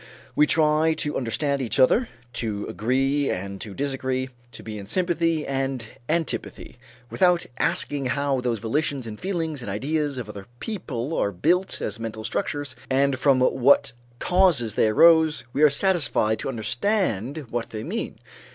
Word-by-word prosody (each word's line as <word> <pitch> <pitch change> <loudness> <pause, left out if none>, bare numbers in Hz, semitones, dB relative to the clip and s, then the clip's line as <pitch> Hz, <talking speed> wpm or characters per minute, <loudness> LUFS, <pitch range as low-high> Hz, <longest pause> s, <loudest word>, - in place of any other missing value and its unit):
We 150 - +5
try 155 +1 +3
to 150 -1 -2
understand 140 +3 -1
each 120 - -2
other, 225 - +4 0.2
to 110 -3 -3
agree 135 +5 0
and 100 +1 -4
to 105 -3 -7
disagree, 130 -2 -2 0.2
to 115 - -11
be 110 -1 -6
in 100 - -9
sympathy 165 - 0
and 135 -3 -2 0.2
antipathy, 160 -6 -3 0.3
without 180 -2 +3
asking 140 -2 0
how 140 0 0
those 120 -2 0
volitions 135 +4 -1
and 105 -2 -7
feelings 165 -6 -2
and 120 - -6
ideas 145 +7 -1
of 120 -4 -5
other 100 -2 -9
people 160 - -4
are 100 - +1
built 175 - +1
as 105 - -3
mental 110 -1 -5
structures, 140 +4 -3
and 135 0 +2
from 135 -2 +4
what 130 -1 +4 0.2
causes 170 - +3
they 110 - +3
arose; 160 +6 +5
we 145 - -1
are 150 - +8
satisfied 145 - +1
to - - -3
understand 140 - -1
what 120 -1 -3
they 110 -1 -6
mean. - - -4
135 Hz, 155 wpm, -24 LUFS, 115-155 Hz, 0.3 s, are